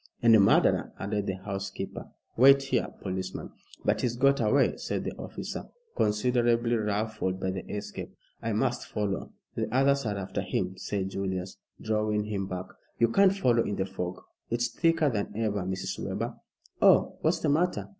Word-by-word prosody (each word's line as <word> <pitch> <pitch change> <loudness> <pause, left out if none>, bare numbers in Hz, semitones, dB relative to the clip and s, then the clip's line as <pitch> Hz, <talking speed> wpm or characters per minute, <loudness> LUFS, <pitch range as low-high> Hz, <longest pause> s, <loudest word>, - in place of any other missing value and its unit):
"And 115 -1 +7
a - - +7
murderer," 100 - +4
added 100 +1 -2
the 95 - -1
housekeeper. 95 0 -5 0.3
"Wait 135 +3 +7
here, 135 - 0 0.2
policeman." 95 -1 -4 0.3
"But - - +2
he's 120 -1 0
got 140 +3 +3
away," 130 +6 +3
said - - -3
the - - -3
officer, - - -6 0.3
considerably 120 +2 +2
ruffled 105 -3 -1
by 95 - -1
the 95 0 -4
escape. 105 0 -5 0.3
"I 115 -1 -1
must 125 +3 0
follow." 105 -3 -2 0.2
"The - - -2
others 135 0 +3
are 100 -1 -1
after 95 -1 -3
him," 90 +1 -2
said 95 0 -3
Julius, 95 -1 -3 0.2
drawing 105 -1 0
him 100 -2 -3
back. 90 -1 -4 0.3
"You 115 0 +3
can't 195 +9 +4
follow 120 -9 +3
in 105 - -2
the 95 - -1
fog. 90 -2 -5 0.3
It's 120 +1 0
thicker 165 -4 +2
than 105 -2 -3
ever. 105 -3 0
Mrs. 95 +1 -3
Webber." - - -3 0.5
"Oh, - - +5
what's 160 +2 +2
the 155 - +1
matter?" 170 +5 +1
105 Hz, 165 wpm, -28 LUFS, 95-125 Hz, 0.5 s, And